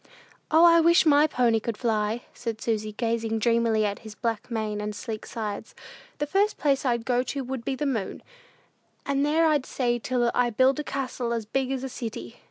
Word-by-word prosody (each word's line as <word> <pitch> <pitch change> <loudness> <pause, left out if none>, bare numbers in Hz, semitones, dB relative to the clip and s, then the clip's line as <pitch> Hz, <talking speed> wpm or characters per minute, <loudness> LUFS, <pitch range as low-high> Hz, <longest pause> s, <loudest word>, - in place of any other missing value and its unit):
"O, 320 +2 +6
I 335 0 +7
wish 340 +1 +5
my 295 0 +5
pony 240 -5 +2
could 220 0 -4
fly," 220 0 -1
said 230 -2 -5
Susy, 215 -2 -2
gazing 225 0 -1
dreamily 230 -1 +2
at 205 -1 -2
his 220 -2 -11
black 230 -1 -3
mane 215 -3 -2
and 210 0 -4
sleek 220 0 -6
sides. 210 -3 -5 0.4
"The 295 - -1
first 395 +7 +1
place 280 -2 +1
I'd 235 -3 0
go 245 -1 +2
to 270 +2 -4
would 260 -1 -5
be 265 - -2
the 295 - -3
moon; 225 -9 -3 0.8
and 280 0 +1
there 310 +3 +3
I'd 300 -4 +2
stay 240 -2 0
till 240 0 0
I 245 -1 +2
built 260 +4 +3
a - - -2
castle 255 -4 -3
as 230 -2 -3
big 260 +4 -1
as 265 -1 -2
a - - -2
city. 220 - -7
240 Hz, 200 wpm, -26 LUFS, 220-275 Hz, 0.8 s, I